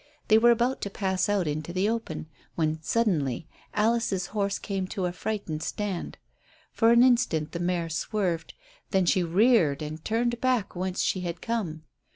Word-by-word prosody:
They 220 0 +7
were 240 +1 +6
about 240 +3 +2
to 200 - -2
pass 190 -1 -1
out 200 -5 +1
into 150 +2 -3
the 185 +3 +1
open 225 -9 -3 0.3
when 155 -1 0
suddenly 165 - 0 0.3
Alice's 215 -3 +1
horse 200 -2 0
came 195 -2 -3
to 185 0 -3
a 175 - -1
frightened 180 -4 -4
stand. 200 -2 -4 0.5
For 225 0 +4
an 235 +1 +7
instant 235 -12 +2
the 170 - -4
mare 175 -1 0
swerved, 170 +1 -2 0.3
then 190 -3 +2
she 180 +2 +3
reared 175 - +3
and 155 +1 -6
turned 235 +1 0
back 255 -7 +1
whence 185 +1 -1
she 185 - 0
had 170 -1 -4
come. 175 -10 -3
190 Hz, 170 wpm, -27 LUFS, 165-225 Hz, 0.5 s, They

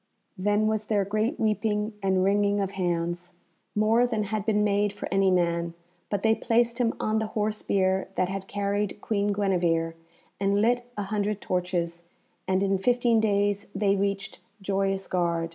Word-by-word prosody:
Then 205 +2 +1
was 215 0 0
there 205 -2 +1
great 215 +8 -1
weeping 215 0 0
and 190 -1 +2
wringing 205 +1 +2
of 195 -1 -1
hands, 175 -2 -2 0.4
more 225 +3 +3
than 220 -3 -1
had 210 +1 -3
been 210 -1 +3
made 205 0 +2
for 205 - -6
any 195 0 +3
man; 170 -2 +1 0.3
but 205 -1 -2
they 220 0 +5
placed 235 +2 +1
him 230 -2 +1
on 215 0 +1
the 220 - -2
horse 215 0 0
bier 190 -1 +1
that 185 - +1
had 190 0 -5
carried 205 0 -2
Queen 205 -2 -1
Guenevere, 175 -5 +1 0.5
and 200 +1 +2
lit 240 +3 +2
a 205 - -1
hundred 205 0 -1
torches, 175 -2 -2 0.5
and 190 +1 +2
in 195 -1 +1
fifteen 240 +1 +3
days 205 -1 +1
they 200 0 +2
reached 200 0 -2 0.2
Joyous 195 0 -1
Gard. 170 -2 0
200 Hz, 165 wpm, -27 LUFS, 190-215 Hz, 0.5 s, they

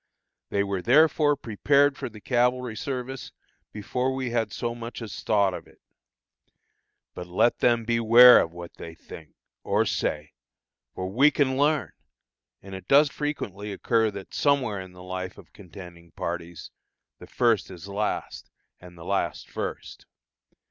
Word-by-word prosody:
They 100 - 0
were 100 -2 -3
therefore 145 - +4
prepared 140 +4 +2
for - - -6
the 110 -1 -13
cavalry 125 0 0
service, 130 +2 -5 0.4
before 125 +5 -2
we 130 -2 -3
had 115 -2 -1
so 120 -1 -3
much 120 0 -8
as 110 -5 -7
thought 100 -3 +2
of - - -8
it. - - -22 1.3
But 90 - -8
let 90 +7 +1
them 120 -2 +2
beware 115 +1 +7
of 80 - -3
what 85 0 -10
they 80 -1 -9
think 80 -1 -13 0.3
or - - +1
say, 75 0 -2 0.6
for 95 - -4
we 130 +10 +4
can 140 -3 0
learn, 145 - +1 0.7
and 95 0 -10
it 95 - -9
does 145 +1 +5
frequently 105 -9 -4
occur 110 +3 +1
that 100 -2 -10
somewhere 130 -8 +1
in 95 -1 -11
the 90 - -14
experience 95 0 -6
of - - -16
contending 90 -3 -13
parties, 85 -1 -6 0.5
"the - - -12
first 115 -5 +1
is 90 -1 -10
last, 100 +2 -4 0.3
and 90 -1 -14
the 85 - -11
last 100 +1 -2
first." - - -6
110 Hz, 150 wpm, -25 LUFS, 95-125 Hz, 1.3 s, beware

